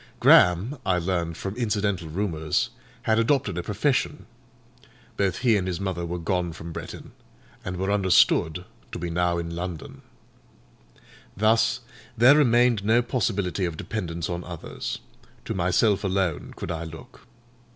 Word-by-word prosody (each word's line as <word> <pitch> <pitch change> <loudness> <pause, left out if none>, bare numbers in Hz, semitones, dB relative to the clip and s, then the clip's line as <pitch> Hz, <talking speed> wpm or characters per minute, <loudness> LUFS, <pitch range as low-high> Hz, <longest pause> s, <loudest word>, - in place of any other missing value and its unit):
Graham, 95 - +5
I 95 -2 +1
learned 85 -2 -2
from 95 +1 -5
incidental 100 -7 -1
rumours, 80 -3 -1 0.3
had 110 0 +2
adopted 115 - +1
a - - -1
profession; 130 - -1 0.9
both 100 -2 0
he 115 -3 +5
and 95 -3 0
his 90 -1 -2
mother 90 -3 -3
were 90 +1 -3
gone 90 0 -1
from 85 +1 -8
Bretton, - - -8 0.5
and 90 0 -4
were 95 +2 -1
understood 90 -3 +3 0.3
to - - -3
be 85 0 -4
now 85 0 +1
in 85 0 -4
London. 85 -2 -6 1.4
Thus, 110 +4 +3 0.4
there 125 +5 +7
remained 120 -6 +4
no 115 +3 +3
possibility 100 -6 -1
of 85 -3 -4
dependence 85 -6 -4
on 85 0 -4
others; 85 -3 -6 0.5
to - - -3
myself 95 +4 +2
alone 95 -5 -1
could - - -5
I 85 0 -3
look. 120 +11 -11
95 Hz, 140 wpm, -25 LUFS, 85-110 Hz, 1.4 s, there